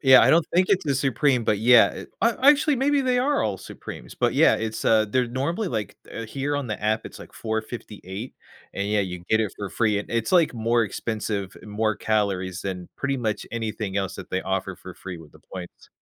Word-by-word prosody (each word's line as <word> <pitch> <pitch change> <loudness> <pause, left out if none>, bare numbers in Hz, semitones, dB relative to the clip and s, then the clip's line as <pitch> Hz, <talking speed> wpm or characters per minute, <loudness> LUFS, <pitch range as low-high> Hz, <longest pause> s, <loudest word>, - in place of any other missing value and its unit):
Yeah, 130 -2 +8
I - - +5
don't 165 -1 +4
think 185 +1 +4
it's 190 -1 +2
the 140 -3 +1
supreme, 135 -1 +2
but, 105 -2 +1
yeah, 120 +2 +7
it - - -9
I 230 - +5 0.2
actually, 295 0 +5
maybe 280 +3 +2
they 255 -2 +1
are 280 +4 +2
all 100 -3 -1
supremes. - - -9
But, - - +1
yeah, - - +5
it's, 110 0 -3
uh 110 -1 +4
they're 125 +2 +2
normally 140 - -2
like, 110 - -3 0.2
uh 115 - -4
here 140 +5 -3
on 140 -4 -3
the 105 - -4
app, 110 +1 0
it's - - -9
like - - -12
4.58, 110 -1 -5 0.4
and 100 - -2
yeah, 105 0 +2
you 90 -2 -4
get 110 - +3
it 105 -5 -1
for 100 - -4
free, 105 0 +1
and 100 - -6
it's, 115 -1 -1
like, 170 -7 +4
more 115 0 +2
expensive, 105 -1 -3
and - - -11
more 110 0 0
calories, 95 -4 -1
than 90 -2 -5
pretty 140 -1 -1
much 110 -4 -2
anything 110 -3 -3
else 100 -1 -1
that - - -9
they 95 - 0
offer 95 -1 -2
for 95 +1 -11
free 90 -3 -8
with 80 -2 -14
the - - -18
points. 90 -2 -9
110 Hz, 225 wpm, -24 LUFS, 100-135 Hz, 0.4 s, Yeah